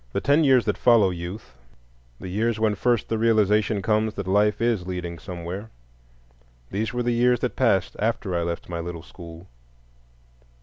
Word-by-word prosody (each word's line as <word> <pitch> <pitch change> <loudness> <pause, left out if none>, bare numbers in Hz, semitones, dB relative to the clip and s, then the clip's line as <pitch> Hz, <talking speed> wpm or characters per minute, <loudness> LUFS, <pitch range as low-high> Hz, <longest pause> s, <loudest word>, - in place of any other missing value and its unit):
The - - 0
ten 145 +3 +3
years 130 -6 +4
that 105 - -1
follow 115 -6 +5
youth, 85 - -7 0.7
the - - -7
years 110 +4 -1
when 110 -1 +2
first 120 +2 0
the 115 - -2
realization 105 -2 +2
comes 110 0 +1
that 100 - -4
life 105 +2 +2
is 115 -6 0
leading 90 -2 -5
somewhere,—these - - -9
were 125 0 -2
the 120 - 0
years 120 0 +2
that - - -2
passed - - +1
after 110 -3 -1
I 85 - 0
left 85 0 -4
my 85 -1 -5
little 85 -1 -6
school. 85 0 -12
100 Hz, 165 wpm, -24 LUFS, 85-110 Hz, 0.7 s, follow